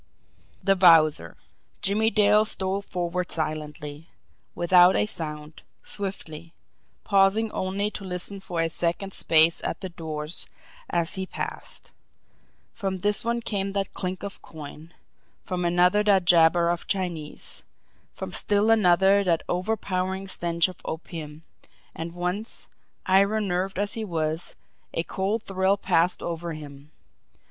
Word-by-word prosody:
The 195 -1 +4
Wowzer! 160 - +5 0.5
Jimmie 210 +3 +3
Dale 210 -1 +5
stole 195 -2 -2
forward 180 -2 -3
silently, 150 -1 -4 0.5
without 180 +1 +6
a - - +3
sound, 150 -5 -4 0.2
swiftly 170 -5 -3 0.5
pausing 200 +2 +3
only 200 +3 -2
to 205 - -7
listen 185 +2 -5
for 175 -3 -3
a 165 - +1
second's 175 +4 -1
space 160 +1 +4
at - - -3
the 190 - -4
doors 155 -2 -3 0.4
as 170 0 0
he 190 -1 -2
passed. - - -4 0.8
From 195 -4 -3
this 205 +2 0
one 235 +1 -1
came 195 -2 -2
that 195 -1 -2
clink 185 0 -4
of 200 -1 -7
coin; 155 +1 -10 0.5
from 180 -2 -3
another 180 +4 +4
that 195 -3 +3
jabber 170 0 +5
of 175 - -4
Chinese; 175 -6 -3 0.5
from - - -6
still 205 +2 +2
another 195 -1 +5
that 170 -4 +1
overpowering 190 0 -2
stench 170 -3 +1
of 185 - -10
opium 160 -2 -7 0.5
and 165 +1 -6
once, 180 +6 -3 0.4
iron 200 +2 +3
nerved 185 +2 -1
as 205 +1 0
he 225 - -3
was, 160 -3 -2 0.4
a 165 - 0
cold 200 +5 -2
thrill 190 +1 +1
passed 180 -2 +1
over 170 0 -4
him. 145 -1 -10
180 Hz, 130 wpm, -26 LUFS, 165-195 Hz, 0.8 s, without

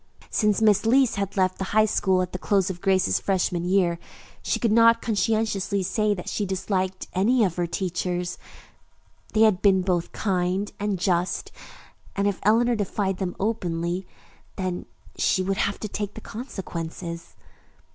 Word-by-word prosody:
Since 210 0 +2
Miss 210 -3 +5
Leece 250 +2 +3
had 200 0 -3
left 185 -1 +1
the - - -1
High 215 - +6
School 190 -3 +2
at 180 - -6
the 185 - -4
close 195 -1 +1
of 175 -1 -9
Grace's 190 - +2
freshman 180 -3 0
year, 175 -2 +2 0.4
she - - -1
could 230 - +1
not 230 +1 +6
conscientiously 215 -2 0
say 210 +2 +1
that 180 - -8
she 210 - -2
disliked 190 -1 -2
any 225 +6 +3
of 180 -5 0
her 175 -1 0
teachers. 180 0 -2 0.9
They 220 - +3
had 215 -5 +4
been 190 -2 +4
both 180 -2 0
kind 190 0 -1
and 205 -1 -1
just, 180 -1 0 0.6
and 200 0 +1
if 200 -2 -1
Eleanor 235 +4 +3
defied 195 -2 -1
them 185 -2 -3
openly, 180 -3 -2 0.5
then 185 -2 -3 0.3
she 185 - +2
would 195 +1 -1
have 200 - -1
to 215 - -3
take 205 0 -4
the 220 - -8
consequences. 170 -7 -6
190 Hz, 160 wpm, -25 LUFS, 180-210 Hz, 0.9 s, High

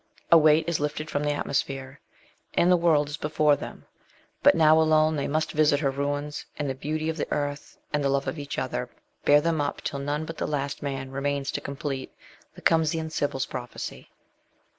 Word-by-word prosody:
A 170 - +10
weight 155 +1 +4
is 170 -2 0
lifted 150 +1 -3
from 145 - -1
the 150 - 0
atmo 145 -1 -2
sphere, 135 -1 -2 0.6
and 175 - +4
the - - +7
world 165 -4 +3
is 150 +1 -5
before 150 -1 +2
them; - - -9 0.6
but - - +6
now 160 -1 +6
alone 155 0 +4
they 140 -2 -1
must 155 +2 0
visit 150 -1 +3
her 135 -3 +1
ruins; 145 +2 -3
and 145 - -2
the 135 - -1
beauty 155 +4 -3
of 160 0 -2
the - - -3
earth 145 0 -3 0.2
and 145 -1 +1
the 140 - +2
love 140 0 0
of 160 - -3
each 145 -1 -5
other, 60 - -2 0.4
bear 145 0 +6
them 165 -1 +1
up 145 - -2
till 140 - -3
none 145 +2 -2
but 165 0 -7
the - - -2
last 140 -1 -2
man 135 -2 -4
remains 140 0 -1
to - - -3
complete 140 -1 -4 0.4
the - - -13
Cumaean 160 -1 +2
Sibyl's 140 -4 -1
prophecy. 120 -1 -7
145 Hz, 205 wpm, -26 LUFS, 140-155 Hz, 0.6 s, A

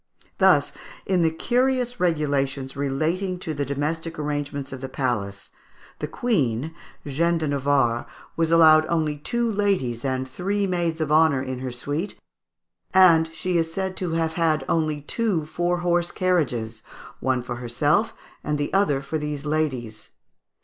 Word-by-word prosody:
Thus, - - +5 0.3
in 185 -2 +2
the 165 - +4
curious 245 +6 0
regulations 140 -5 0
relating 160 +7 -1
to 165 -3 -4
the 140 -1 -2
domestic 160 +4 -3
arrangements 145 -2 -3
of 130 - -7
the 130 - -5
palace, 100 -7 -3 0.5
the 150 - -3
Queen, 155 - 0 0.3
Jeanne 165 +4 +1
de 160 -1 -2
Navarre, 135 -4 +1 0.3
was 165 0 +1
only 165 0 +6 0.3
allowed 155 -3 -1
two 235 +5 0
ladies 195 - 0
and 130 -1 -1
three 200 +9 -1
maids 170 -3 -1
of 155 -1 -1
honour 155 -4 +4
in 130 -1 -4
her 130 -1 -4
suite, 145 +10 -4 0.8
and 165 -4 +6
she 170 +2 -1
is 165 0 -1
said 190 +2 -3
to 175 -3 -2
have 165 -1 0
had 160 -2 +1
only 155 -3 0
two 185 0 -1
four 175 +3 -1
horse 175 0 +1
carriages, 125 -12 -1 0.4
one 130 -2 0
for 120 0 -5
herself 145 - +1 0.3
and 150 0 -1
the 145 0 -3
other 150 -9 +2
for 155 +3 -3
these 150 -1 -4
ladies. 130 -8 -2
155 Hz, 150 wpm, -24 LUFS, 135-175 Hz, 0.8 s, only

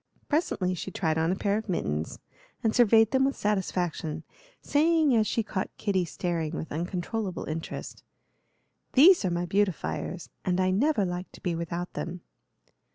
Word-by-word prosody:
Presently 210 - 0
she 180 - -5
tried 160 -4 0
on 165 +2 +2
a - - +1
pair 200 +2 0
of 220 - -10
mittens, 80 - -2 0.5
and 220 -1 +2
surveyed 225 -2 +5
them 265 0 +3
with 275 0 +1
satisfaction, 175 -6 -1 0.4
saying 310 -2 +3
as 215 -2 +3
she 230 - 0
caught 190 -2 -3
Kitty 190 -4 0
staring 165 -2 -2
with 160 - -5
uncontrollable 180 +4 -3
interest: 160 +1 -6 0.9
"These 335 - +7
are - - +2
my 175 0 -1
beautifiers, 185 -2 -1
and 180 0 0
I 185 0 +3
never 220 +1 +2
like 180 +1 -4
to - - -13
be 180 - 0
without 170 +1 -4
them." 175 +1 -5
185 Hz, 160 wpm, -28 LUFS, 170-220 Hz, 0.9 s, These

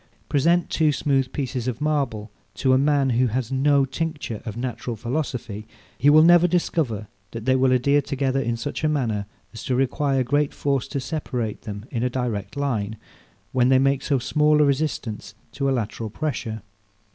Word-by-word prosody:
Present 165 +5 +2
two 155 -2 +3
smooth 135 -2 0
pieces 130 -3 -3
of 125 -2 -2
marble 135 -9 -1 0.2
to 130 -1 +2
a - - +5
man 140 -2 +2
who 125 +2 +3
has 120 +1 -2
no 140 +1 +3
tincture 145 -5 -4
of 110 0 -5
natural 120 -1 -4
philosophy; 120 -3 -4 0.3
he 140 - +3
will 155 +1 +7
never 175 +1 +6
discover 155 - -1 0.2
that 115 0 -7
they 130 - +3
will 130 0 +3
adhere 140 +3 +3
together 135 -1 -1
in 120 -2 -1
such 145 +6 -5
a 155 - +3
manner 115 -9 -1 0.3
as 115 - -8
to 130 - 0
require 135 +1 +1
great 145 +3 0
force 140 -3 0
to 140 - -3
separate 130 -5 -3
them 105 0 -7
in 120 -5 -2
a 125 - +1
direct 120 -2 -3
line, 110 -7 -1 0.5
while 125 -1 +3
they 130 - +6
make 135 0 +2
so 140 -1 +1
small 150 +4 +2
a 150 - +5
resistance 130 -8 -2 0.2
to 140 0 -1
a - - +2
lateral 115 -2 -2
pressure. 110 -4 -4
130 Hz, 180 wpm, -23 LUFS, 115-145 Hz, 0.5 s, will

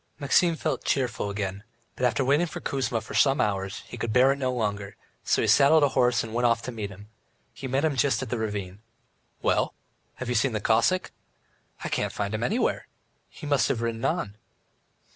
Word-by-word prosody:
Maxim 165 +4 +3
felt - - -2
cheerful 120 -6 -1
again, 100 -1 -4 0.3
but 125 - +2
after 130 +2 0
waiting 145 +6 +3
for - - -7
Kuzma 125 -4 -2
for - - -10
some 135 -1 +3
hours, 100 0 -1
he - - -9
could 115 0 -3
bear 130 +3 +5
it 140 - -2
no 130 -2 0
longer, 105 -5 -3 0.3
so - - +1
he - - +1
saddled 145 +2 +6
a 145 - +4
horse 125 -2 +2
and 110 -1 -7
went 120 +1 +2
off 115 0 +1
to 125 - -4
meet 110 -4 -5
him. 100 +2 -13 0.4
He 135 - -6
met 135 +4 +1
him 155 -3 +1
just 135 0 +1
at 125 - -7
the 120 - -1
Ravine. 100 -3 -4 0.6
"Well, - - +1 0.4
have 130 - -6
you 125 - 0
seen 120 +1 +2
the 110 - 0
Cossack?" 115 - +2 0.7
"I - - -3
can't - - -1
find 100 0 -3
him 110 - -2
anywhere, 220 - 0 0.4
he 155 - -11
must 145 -2 +2
have 115 -2 -1
ridden 115 -1 -3
on." 110 - -1
120 Hz, 205 wpm, -26 LUFS, 105-135 Hz, 0.7 s, saddled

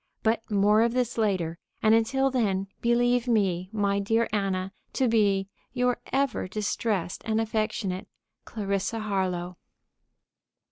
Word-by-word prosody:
But 225 +1 +2
more 210 +1 +4
of 235 0 +2
this 250 -1 0
later, 185 -7 0 0.2
and 220 0 +5
until 265 +4 +2
then, 200 -7 +1 0.2
believe 245 +1 +2
me, 190 -6 +1
my 200 -2 +1
dear 225 +3 +1
Anna, 195 -2 -1 0.2
to 260 - +2
be 200 -4 +2 0.3
Your 250 -1 +1
ever 270 -6 0
distressed 205 -2 -2
and 220 -1 0
affectionate 215 -4 -2 0.4
CL. 200 0 -2
HARLOWE. 185 -4 -2
215 Hz, 125 wpm, -27 LUFS, 195-230 Hz, 0.4 s, and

